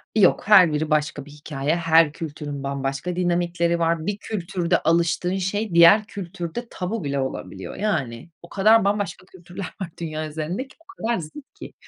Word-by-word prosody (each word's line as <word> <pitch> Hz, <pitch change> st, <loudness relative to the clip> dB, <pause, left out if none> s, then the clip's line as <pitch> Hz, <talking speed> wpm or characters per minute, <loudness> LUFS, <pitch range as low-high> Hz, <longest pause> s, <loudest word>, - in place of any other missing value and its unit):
Yok. 200 Hz, -5 st, +4 dB
Her 185 Hz, -7 st, +7 dB
biri 155 Hz, +1 st, -1 dB
başka 150 Hz, -2 st, 0 dB
bir 145 Hz, -, -14 dB
hikâye, 145 Hz, 0 st, -2 dB
her 165 Hz, -2 st, +4 dB
kültürün 145 Hz, -3 st, -6 dB
bambaşka 140 Hz, +5 st, -3 dB
dinamikleri 175 Hz, -1 st, 0 dB
var. 165 Hz, -1 st, 0 dB
Bir 205 Hz, 0 st, -2 dB
kültürde 180 Hz, -4 st, -1 dB
alıştığın 170 Hz, +3 st, +1 dB
şey 195 Hz, +1 st, -2 dB
diğer 170 Hz, +6 st, +8 dB
kültürde 190 Hz, +3 st, -6 dB
tabu 185 Hz, +3 st, -4 dB
bile 140 Hz, -1 st, -2 dB
olabiliyor. 95 Hz, -8 st, -5 dB
Yani, 155 Hz, -, -2 dB
o 170 Hz, -, -14 dB
kadar 215 Hz, +1 st, +4 dB
bambaşka 200 Hz, -3 st, -1 dB
kültürler 185 Hz, +1 st, -9 dB, 0.2 s
var 185 Hz, -, -3 dB
dünya 155 Hz, -1 st, -4 dB
üzerindeki, 160 Hz, -, -5 dB
o 330 Hz, -, -26 dB, 0.2 s
kadar 235 Hz, -1 st, +1 dB
zıt 170 Hz, -, -10 dB
ki. -, -, -11 dB
170 Hz, 160 wpm, -23 LUFS, 155-195 Hz, 0.2 s, diğer